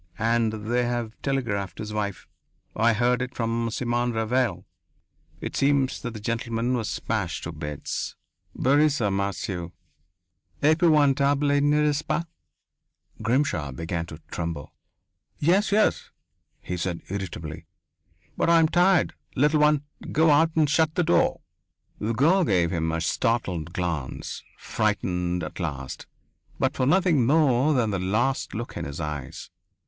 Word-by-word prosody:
And 115 0 +2
they 120 +2 +1
have 120 -2 -2
telegraphed 115 -8 -2
his 105 0 -6
wife.... 100 -3 -3 0.5
I 115 +1 +3
heard 120 +2 +2
it 125 0 -4
from 115 0 -1
Simon 120 +1 -1
Ravanel.... 110 -4 0 0.8
It - - -5
seems 140 -1 +2
that 120 -2 -5
the - - -5
gentleman 115 +2 -1
was 115 -4 -1
smashed 100 -7 -2
to 80 - -4
bits 75 -2 -5 0.4
brise 145 +2 +3
en 105 -4 +1
morceau. 95 -3 -3 0.9
Épouvantable, 145 -3 +4
n'est 150 +1 +3
ce 145 - -1
pas?" 170 - -1 1.0
Grimshaw 115 - 0
began 85 +4 -4
to 80 - -9
tremble. 85 -4 -4 0.6
"Yes, 190 +8 +2
yes," 215 +1 +2 0.5
he 90 - -4
said 85 0 -3
irritably. 90 -5 -6 0.7
"But - - +1
I 170 - +6
am 160 -1 +4
tired, 180 -1 +3 0.2
little 150 +3 +3
one. 150 -1 +4 0.3
Go 160 0 +4
out, 160 +3 +5
and 155 -2 +4
shut 155 +2 +2
the 180 - +2
door!" 85 - +2 0.6
The 110 +2 -1
girl 165 - +4
gave 90 - +2
him 80 -2 -1
a 80 0 -2
startled 90 -3 -1
glance, 85 -8 -4 0.2
frightened 90 -1 -1
at 75 - -7
last, 70 -7 -5 0.5
but - - 0
for 130 - +1
nothing 170 -4 +3
more 145 -1 +3
than 115 -4 +1
the 95 - -1
lost 110 +10 0
look 115 +2 -5
in - - -4
his 70 +2 -6
eyes. 75 -4 -6
115 Hz, 140 wpm, -25 LUFS, 90-145 Hz, 1.0 s, I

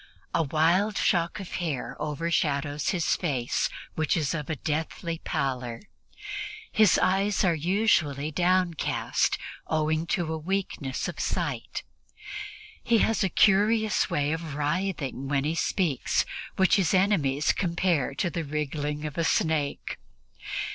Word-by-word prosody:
A - - +3
wild 165 +8 +2
shock 170 +2 +1
of 195 - -5
hair 135 -8 -3
overshadows 150 -1 0
his 180 -4 +1
face, 135 -9 0 0.2
which 155 +2 +1
is 150 -4 0
of 150 -4 -4
a 160 - 0
deathly 160 +3 -3
pallor; 125 -6 -2 0.9
his 215 -3 +5
eyes 195 +2 +2
are 180 -3 +4
usually 160 -4 +1
downcast, 180 0 +1 0.3
owing 155 +1 0
to 170 -3 0
a 160 - -3
weakness 165 -6 -2
of - - -6
sight. - - -2 1.0
He 235 - +3
has 225 -2 +1
a 190 - +2
curious 215 +3 +3
way 145 0 +1
of 160 -2 -4
writhing 150 -3 -2
when 140 0 +1
he 155 +2 0
speaks, 165 -4 +1 0.3
which 190 +2 +4
his 190 -1 +2
enemies 155 -8 +2
compare 170 -6 0
to 175 +2 0
the 170 -1 -2
wriggling 150 0 -3
of 150 +2 -4
a - - +2
snake. 160 -3 0
160 Hz, 130 wpm, -27 LUFS, 145-185 Hz, 1.0 s, his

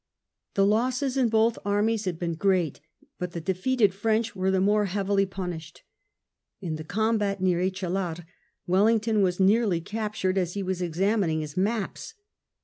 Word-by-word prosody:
The 195 - +4
losses 250 +5 +1
in 255 -3 +2
both 225 +1 +2
armies 205 +2 +1
had 180 -3 -2
been 170 0 -2
great, 180 -3 +1 0.4
but 180 -2 -4
the 170 - -3
defeated 195 +5 +1
French 220 +2 0
were 190 0 0
the 190 0 +2
more 205 +2 +3
heavily 195 0 0
punished. 175 -4 -7 0.8
In 170 -5 -4
the 155 - -7
combat 210 +2 0
near 180 -2 +2
Echallar 185 -2 -2 0.4
Wellington 215 +3 +3
was 180 -1 +1
nearly 195 -2 +3
captured 205 0 -2
as 180 0 -2
he 200 - -2
was 185 -1 -2
examining 175 -1 0
his 150 -1 -7
maps. 215 - -2
195 Hz, 150 wpm, -26 LUFS, 180-215 Hz, 0.8 s, The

